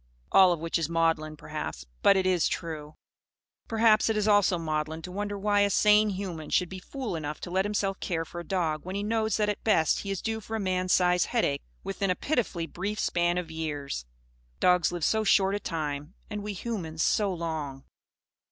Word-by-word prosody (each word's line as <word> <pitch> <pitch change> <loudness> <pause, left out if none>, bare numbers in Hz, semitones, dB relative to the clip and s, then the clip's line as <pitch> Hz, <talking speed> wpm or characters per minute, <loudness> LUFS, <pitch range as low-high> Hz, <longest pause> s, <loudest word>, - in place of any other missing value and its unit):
All 190 -2 +7
of 170 - 0
which 165 +1 -1
is 160 -1 -1
maudlin, 165 -2 +1
perhaps; - - -6 0.2
but 200 - +6
it 190 - +1
is 185 -3 +3
true. 155 -3 -5 0.7
Perhaps 225 -1 +4
it 220 - +1
is 210 0 +1
also 205 -3 +4
maudlin 155 0 -3
to 180 - -7
wonder 205 +1 -3
why 205 +1 +2
a 205 0 +4
sane 210 +1 +5
human 185 -6 -5
should 180 -2 +2
be 190 - -7
fool 250 0 -5
enough 150 -2 -4
to 175 - -6
let 190 +2 +1
himself 200 -1 -1
care 165 -3 -2
for 175 - -8
a - - -5
dog, 160 -4 -1
when 185 +2 -5
he 200 - -2
knows 220 0 0
that 210 -1 +1
at 210 - -2
best 160 -8 +3
he 200 - -5
is 195 -2 -2
due 225 -1 -1
for 220 +2 -5
a - - -1
man's 185 -2 0
size 180 -1 +4
heartache 180 - 0 0.2
within 195 0 -2
a 180 - +2
pitifully 225 - -1
brief 195 +6 -4
span 175 -1 +1
of 175 -3 -3
years. 145 - -4 0.5
Dogs 180 -1 +4
live 175 -3 -2
so 220 0 +2
short 195 -1 +4
a 205 - -1
time; 150 -1 -4 0.2
and 210 0 -3
we 210 0 -4
humans 180 -7 -3
so 205 -2 +2
long! 160 -6 -4
180 Hz, 205 wpm, -28 LUFS, 160-205 Hz, 0.7 s, All